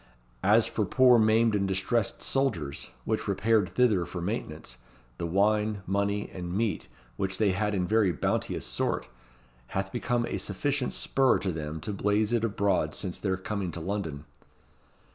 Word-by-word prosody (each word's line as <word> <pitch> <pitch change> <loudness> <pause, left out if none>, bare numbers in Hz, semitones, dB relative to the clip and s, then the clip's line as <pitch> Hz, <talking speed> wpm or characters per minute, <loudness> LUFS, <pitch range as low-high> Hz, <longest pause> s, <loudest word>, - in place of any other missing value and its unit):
As - - +5
for - - -1
poor 125 -2 +5
maimed 110 +1 +4
and 100 -1 +1
distressed 95 +3 0
soldiers, 105 - -1 0.2
which - - -1
repaired 105 -2 +2
thither 110 -8 +3
for 90 - -6
maintenance, 80 - -4 0.4
the 85 - -2
wine, 105 +2 +1
money, 100 +1 0
and 90 -2 -5
meat 110 -2 -1 0.3
which 95 0 -2
they 105 -3 +3
had 105 +2 0
in 90 -2 0
very 105 -1 +3
bounteous 85 - -1
sort, - - -1 0.7
hath 95 0 -2
become 120 +3 0
a - - -3
sufficient 130 +6 -1
spur 135 -1 +2
to 95 -1 -2
them 80 -1 -5
to 105 - -4
blaze 105 +3 +1
it 115 -1 +1
abroad 100 -3 +1
since 90 - -4
their 95 -2 -1
coming 95 -1 -3
to - - -5
London." 80 -5 -4
100 Hz, 160 wpm, -28 LUFS, 95-110 Hz, 0.7 s, As